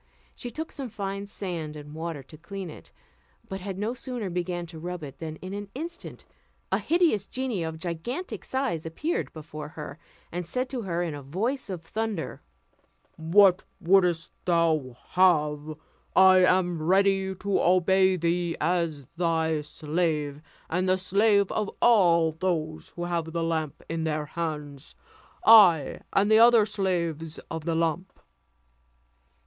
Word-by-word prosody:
She 245 - -7
took 315 +7 -6
some 270 -4 -5
fine 200 -2 -4
sand 170 -7 -5
and 150 0 -10
water 160 -3 -5
to 145 - -14
clean 190 +2 -7
it; - - -14 0.6
but 190 0 -6
had 190 0 -5
no 215 +4 -1
sooner 245 -6 -5
begun 175 0 -2
to 165 -1 -10
rub 175 0 -5
it, 140 -2 -9
than 160 -1 -5
in 185 +1 -6
an 205 0 -6
instant 335 +5 -7 0.5
a - - +2
hideous 325 - +2
genie 255 -7 -2
of 160 -1 -4
gigantic 195 - -5
size 260 - -2
appeared 300 - -2
before 155 -1 -8
her, 150 -1 -8 0.3
and 175 +1 -3
said 250 +9 -2
to 255 -3 -3
her 175 -4 -2
in 165 -3 -3
a 145 - -7
voice 210 - -2
of 180 -4 -5
thunder, 220 +5 -4 0.7
"What 180 +3 +4 0.2
wouldst 175 -2 +3
thou 160 -8 +1
have? 155 -4 +2 0.4
I 190 0 +7
am 180 -3 +2
ready 190 +2 +2
to 200 +1 0
obey 185 +1 +4
thee 170 0 0
as 165 -3 0
thy 160 -2 +1
slave, 150 -1 -2 0.3
and 185 +2 0
the 185 - +4
slave 200 +1 +2
of 210 -2 -1
all 170 -8 +5
those 160 -2 -2
who 175 - -4
have 170 -2 -1
that 170 - -2
lamp 160 -3 -2
in 165 0 -2
their 155 -1 -1
hands; 150 -3 -5 0.5
I 190 -10 +7
and 205 +2 +2
the 220 - +7
other 230 -2 +7
slaves 170 -6 -2
of 160 -1 -5
the 165 - 0
lamp." 165 +3 -1
175 Hz, 150 wpm, -27 LUFS, 160-195 Hz, 0.7 s, I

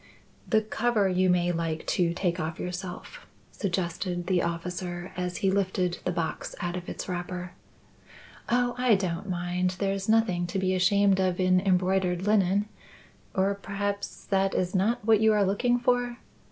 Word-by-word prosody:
"The 220 -1 +3
cover 220 -1 +1
you 185 0 +2
may 175 0 +3
like 165 -2 -2
to 175 -2 +2
take 180 -1 -1
off 160 -1 -3
yourself," 180 - -6 0.2
suggested 175 -1 -2
the 180 -1 +2
officer, 175 +1 -4
as 180 0 -3
he 190 - +4
lifted 185 -2 0
the 180 - +1
box 170 -2 -3
out 175 0 -2
of 180 -1 -6
its - - -5
wrapper. 180 0 -4 1.0
"Oh, 245 0 +2
I 250 -3 +5
don't 190 0 -3
mind. 180 +1 -1
There's 195 +1 -1
nothing 215 -6 +2
to 175 - -3
be 185 -1 +1
ashamed 195 +1 +3
of 185 -1 +1
in 185 0 +4
embroidered 185 -1 +1
linen. 205 -1 +2 0.7
Or 195 +1 +2
perhaps 200 0 -4
that 195 0 +1
is 180 0 0
not 210 +4 +1
what 220 -2 +5
you 220 0 +5
are 205 -1 +3
looking 240 +6 +2
for?" 245 0 0
185 Hz, 160 wpm, -27 LUFS, 180-200 Hz, 1.0 s, I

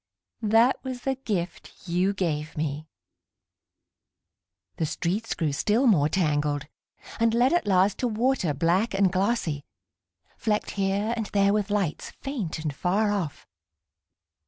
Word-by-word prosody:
That 225 +4 +3
was 255 -2 -5
the 270 - 0
gift 200 -8 -5
you 180 +3 +2
gave 155 -6 -2
me.... 150 0 -3 1.9
The 160 - 0
streets 195 +9 -2
grew 155 -4 -1
still 215 - +2
more 160 - +4
tangled, 150 -4 0 0.5
And 230 0 +3
led 250 +5 +4
at 345 -7 +1
last 190 0 +3
to 250 - +1
water 225 - +1
black 180 - +1
and 195 -2 +3
glossy, 185 -7 0 0.7
Flecked 215 -2 -1
here 200 +3 0
and 225 -3 -3
there 200 0 +3
with 210 -1 0
lights, 200 -7 -1
faint 245 - -4
and 155 -2 -3
far 200 +8 +1
off. 185 -8 -3
195 Hz, 135 wpm, -26 LUFS, 165-225 Hz, 1.9 s, more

